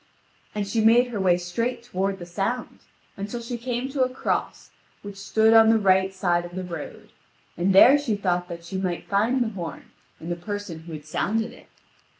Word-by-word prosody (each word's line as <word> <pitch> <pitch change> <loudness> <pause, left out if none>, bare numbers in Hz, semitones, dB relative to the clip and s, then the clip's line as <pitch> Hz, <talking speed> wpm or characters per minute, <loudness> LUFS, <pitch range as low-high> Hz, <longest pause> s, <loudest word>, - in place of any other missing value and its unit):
And 205 -1 -2
she 220 +3 0
made 240 +3 +5
her 225 -4 -4
way 180 -2 +3
straight 230 +8 -3
toward 195 -4 -2
the 175 - -8
sound, 195 +8 -3 0.4
until 205 +4 -5
she 235 +1 -5
came 245 +1 -3
to 270 -1 -2
a 255 - +3
cross 255 - -3 0.3
which 205 -1 -8
stood 220 +3 +2
on 225 0 +7
the 225 - +5
right 190 -2 +3
side 175 -2 0
of 175 0 -9
the 185 - -3
road, 175 -2 -8 0.4
and 180 +3 +1
there 255 +9 +8
she 240 -7 -1
thought 180 -3 -1
that 170 -1 -8
she 190 +2 -5
might 180 -2 -3
find 225 +6 +1
the 225 - -2
horn 180 -6 -7 0.3
and 165 +2 -6
the - - 0
person 205 -1 -6
who 170 - -9
had 150 -1 -8
sounded 220 +8 -1
it. - - -17
200 Hz, 200 wpm, -24 LUFS, 180-230 Hz, 0.4 s, there